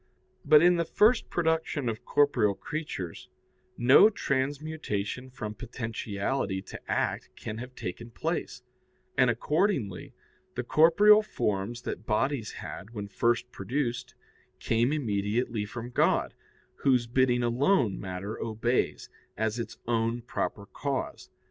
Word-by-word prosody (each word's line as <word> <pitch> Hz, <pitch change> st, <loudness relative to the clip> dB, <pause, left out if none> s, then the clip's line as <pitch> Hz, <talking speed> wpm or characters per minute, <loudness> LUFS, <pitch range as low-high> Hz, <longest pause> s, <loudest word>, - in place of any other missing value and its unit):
But 150 Hz, +1 st, +7 dB
in 175 Hz, 0 st, +5 dB
the 170 Hz, -, +2 dB
first 215 Hz, +8 st, +3 dB
production 160 Hz, -5 st, 0 dB
of 115 Hz, +2 st, -3 dB
corporeal 140 Hz, -9 st, +3 dB
creatures 125 Hz, -, -6 dB, 0.5 s
no 130 Hz, -, +7 dB
transmutation 135 Hz, -, -2 dB
from 110 Hz, -5 st, -6 dB
potentiality 110 Hz, -2 st, -3 dB
to -, -, -9 dB
act -, -, -1 dB
can 110 Hz, +1 st, -6 dB
have 125 Hz, +1 st, -8 dB
taken 105 Hz, +6 st, -6 dB
place, 115 Hz, -, -3 dB, 0.5 s
and 125 Hz, -, +4 dB
accordingly, 135 Hz, -, 0 dB, 0.4 s
the -, -, -2 dB
corporeal 205 Hz, +7 st, +6 dB
forms 115 Hz, -, -2 dB
that 110 Hz, -, -5 dB
bodies 115 Hz, +1 st, 0 dB
had 110 Hz, +4 st, -8 dB
when 100 Hz, -1 st, -5 dB
first 120 Hz, +3 st, 0 dB
produced 120 Hz, +3 st, -3 dB, 0.4 s
came 115 Hz, +3 st, +1 dB
immediately 110 Hz, -4 st, -1 dB
form 120 Hz, +3 st, -7 dB
God, -, -, +2 dB, 0.4 s
whose 125 Hz, -4 st, +3 dB
bidding 125 Hz, 0 st, +2 dB
alone 120 Hz, -, +2 dB
matter 95 Hz, +2 st, -5 dB
obeys, 115 Hz, +2 st, -1 dB, 0.3 s
as 110 Hz, +1 st, -1 dB
its 115 Hz, -1 st, -5 dB
own 115 Hz, 0 st, 0 dB
proper 105 Hz, -3 st, -3 dB
cause. 135 Hz, +6 st, -4 dB
120 Hz, 120 wpm, -28 LUFS, 110-140 Hz, 0.5 s, But